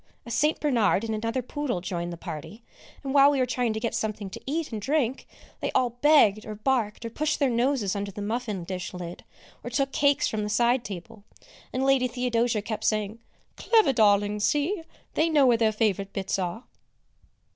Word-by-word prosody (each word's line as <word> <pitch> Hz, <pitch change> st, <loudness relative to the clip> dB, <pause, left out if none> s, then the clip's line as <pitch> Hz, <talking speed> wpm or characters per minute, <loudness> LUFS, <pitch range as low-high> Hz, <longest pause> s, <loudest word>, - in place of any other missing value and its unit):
A 235 Hz, -, -8 dB
St. 295 Hz, +7 st, +1 dB
Bernard 230 Hz, -8 st, +2 dB
and 225 Hz, -1 st, -2 dB
another 230 Hz, +4 st, -2 dB
poodle 265 Hz, -5 st, -3 dB
joined 175 Hz, -1 st, -4 dB
the 170 Hz, -, -7 dB
party, 160 Hz, +8 st, -8 dB, 0.4 s
and 270 Hz, -1 st, -3 dB
while 280 Hz, 0 st, +7 dB
we 290 Hz, -, +1 dB
were 255 Hz, -, +2 dB
trying 245 Hz, -1 st, 0 dB
to 220 Hz, -, -3 dB
get 230 Hz, +1 st, -2 dB
something 210 Hz, -2 st, -3 dB
to -, -, -8 dB
eat 310 Hz, +1 st, -2 dB
and 215 Hz, -2 st, -4 dB
drink, 265 Hz, 0 st, 0 dB, 0.3 s
they -, -, -2 dB
all 250 Hz, -2 st, +2 dB
begged 245 Hz, -5 st, +4 dB
or 215 Hz, -, -7 dB
barked 225 Hz, -1 st, -1 dB
or 230 Hz, -, -5 dB
pushed 300 Hz, +5 st, -1 dB
their 275 Hz, -3 st, +2 dB
noses 235 Hz, -4 st, +1 dB
under 200 Hz, 0 st, -3 dB
the 200 Hz, -, -9 dB
muffin 215 Hz, -3 st, -3 dB
dish 180 Hz, +1 st, -5 dB
lid, 175 Hz, -1 st, -7 dB, 0.4 s
or -, -, -5 dB
took 275 Hz, +2 st, 0 dB
cakes 285 Hz, 0 st, +2 dB
from 215 Hz, -, -2 dB
the 210 Hz, -, -3 dB
side 240 Hz, +3 st, +2 dB
table; 205 Hz, +2 st, -8 dB, 0.5 s
and 260 Hz, +1 st, -1 dB
Lady 270 Hz, -2 st, +3 dB
Theodosia 240 Hz, -3 st, 0 dB
kept 215 Hz, -1 st, -4 dB
saying, 215 Hz, +1 st, 0 dB, 0.4 s
"Clever 440 Hz, -, +3 dB
darlings; 205 Hz, -2 st, +3 dB
see, 315 Hz, -, +1 dB, 0.3 s
they 320 Hz, +1 st, +2 dB
know 295 Hz, -4 st, +4 dB
where 240 Hz, -2 st, +5 dB
their 225 Hz, -1 st, +3 dB
favourite 200 Hz, -2 st, -1 dB
bits 195 Hz, 0 st, -2 dB
are." 185 Hz, +6 st, -3 dB
230 Hz, 195 wpm, -26 LUFS, 205-265 Hz, 0.5 s, while